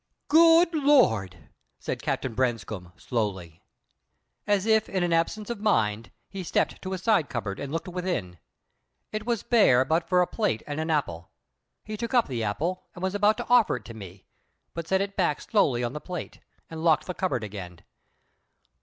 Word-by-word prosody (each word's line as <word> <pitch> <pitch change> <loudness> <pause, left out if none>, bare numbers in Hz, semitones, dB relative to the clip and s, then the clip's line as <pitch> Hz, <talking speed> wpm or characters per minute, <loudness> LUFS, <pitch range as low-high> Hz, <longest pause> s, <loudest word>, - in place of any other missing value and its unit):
"Good 330 +2 +6
Lord!" 110 - +2 0.3
said - - -5
Captain 130 - -2
Branscome, 110 -7 -2
slowly. 95 -9 -3 0.9
As 205 -1 +2
if 220 -1 +3
in 185 -2 -1
absence 205 +7 0
of 235 - -5
mind, 110 - +1 0.2
he 195 - -7
stepped 175 - -1
to 190 0 -5
a - - -2
side 190 -5 +1
cupboard 105 -5 -4
and 140 -1 -5
looked 165 +3 -3
within. 175 - -3 0.7
It 215 +1 -5
was 235 -3 0
bare 130 - +4
but 160 +4 0
for 180 -1 +4
a - - 0
plate 205 - -1
and 145 +1 -4
an 160 +1 -2
apple. 90 - -1 0.6
He 215 0 -5
took 235 +3 -3
up 240 - +4
the 120 -4 -3
apple, 160 - -2
and 175 - -8
was 190 0 0
about 205 +1 +3
to - - -5
offer 245 -3 +4
it - - -8
to 115 - -9
me, 95 -3 -11 0.5
but 165 -1 -5
set 190 +2 +2
it 200 0 -3
back 170 -6 +1
slowly 135 - +1
on 120 +1 -2
the 150 - -6
plate, 180 -3 -7 0.3
and 160 0 -7
locked 160 -2 +3
the 180 - -4
cupboard 180 -11 -2
again. 95 -5 -8
165 Hz, 180 wpm, -26 LUFS, -, 0.9 s, Good